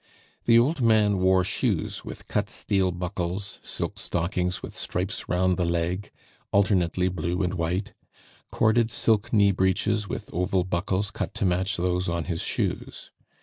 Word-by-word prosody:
The 115 -1 +6
old 135 +5 +3
man 105 -4 +4
wore 95 0 +4
shoes - - -1
with - - -9
cut - - -1
steel 95 -2 +1
buckles, 90 +2 -4
silk - - -4
stockings 90 +1 -1
with - - -7
stripes 95 +5 -3
round 90 0 +2
the 90 - +1
leg, 85 +3 -1 0.4
alternately 95 -3 +2
blue 90 0 -1
and 90 0 -1
white, 90 +3 -2 0.6
corded 110 +1 +2
silk 110 0 +1
knee 100 -3 +5
breeches 100 +2 +1
with - - -6
oval 90 +1 +1
buckles 95 +3 -1
cut 110 - -4
to 110 -2 0
match 95 +2 +1
those 90 0 0
on 85 -1 -1
his 85 -1 -2
shoes. - - -2
95 Hz, 150 wpm, -26 LUFS, 90-100 Hz, 0.6 s, The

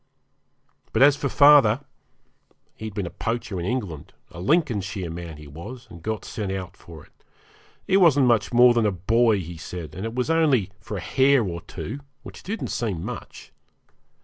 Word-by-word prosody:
But - - +4
as 145 0 +6
for 140 -1 -2
father, 140 -5 +6 0.9
he'd 110 -2 -8
been 100 - -2
a 85 - -6
poacher 115 -4 -3
in 85 - -3
England, 100 - -4 0.2
a - - -10
Lincolnshire 100 - 0
man 85 -2 -7
he 75 - -12
was, 105 - -10
and 85 - -11
got 110 +3 -4
sent 105 -4 -4
out 95 -1 -5
for 80 -5 -13
it. - - -31 0.6
He 190 - +3
wasn't 150 -8 +5
much 115 -4 +2
more 120 0 +6
than 115 -2 +2
a - - +1
boy, 110 +5 +2
he 85 0 -8
said, 85 0 -7
and 95 - -6
it 115 +1 -4
was 125 +5 0
only 140 - +2
for 105 -1 -6
a - - -5
hare 135 +5 +3
or 85 -4 -4
two, 120 - -7 0.2
which - - -11
didn't 220 +4 -4
seem 100 -7 -3
much. 120 0 -8
110 Hz, 180 wpm, -24 LUFS, 90-130 Hz, 0.9 s, as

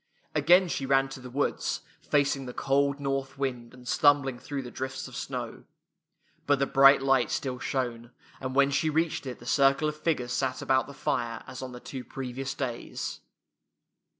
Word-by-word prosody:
Again 180 +1 +5
she 135 -5 -2
ran 135 0 +3
to 135 - -8
the 125 0 -9
woods, 140 +3 -1 0.2
facing 140 -2 +1
the 125 - -7
cold 140 +1 +1
north 135 -1 -2
wind 125 -4 -3
and 125 -1 -14
stumbling 140 -3 +3
through 140 0 -5
the 125 - -8
drifts 130 +1 -4
of 130 - -11
snow. 125 -3 -5 0.8
But 145 0 +4
the 140 - +2
bright 135 0 +6
light 135 -2 +3
still 130 -2 -2
shone, 120 -3 -2 0.3
and 130 0 -4
when 140 0 +4
she 155 +3 +1
reached 160 -2 0
it 125 - -5
the 120 - -14
circle 140 +3 +3
of 150 - -2
figures 150 -6 -1
sat 130 -1 -1
about 130 -1 +2
the 140 - -10
fire 120 -3 -2
as - - -8
on 130 -1 -6
the 125 - -8
two 130 0 -7
previ 130 -1 -6
ous 135 0 -3
days. 125 -4 -4
135 Hz, 185 wpm, -28 LUFS, 125-140 Hz, 0.8 s, bright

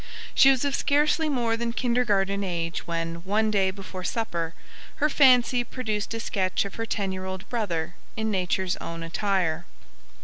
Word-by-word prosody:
She 270 - +7
was 270 0 +3
of 280 - 0
scarcely 300 +3 +2
more 240 -5 +1
than 235 0 -2
kindergarten 205 -6 +1
age 170 -2 -3
when, 165 0 -2
one 210 +5 0
day 195 -2 +3
before 190 -1 -7
supper, 170 -7 -2 0.4
her 300 - +2
fancy 250 -3 +5
produced 225 -3 -3
a - - -3
sketch 190 -4 0
of 200 - -6
her 225 0 -4
ten 200 -4 -1
year 185 0 -5
old 190 0 -6
brother 175 -8 -2 0.2
in 220 0 0
nature's 185 -1 0
own 165 0 -6
attire. 170 -1 0
200 Hz, 165 wpm, -26 LUFS, 185-235 Hz, 0.4 s, She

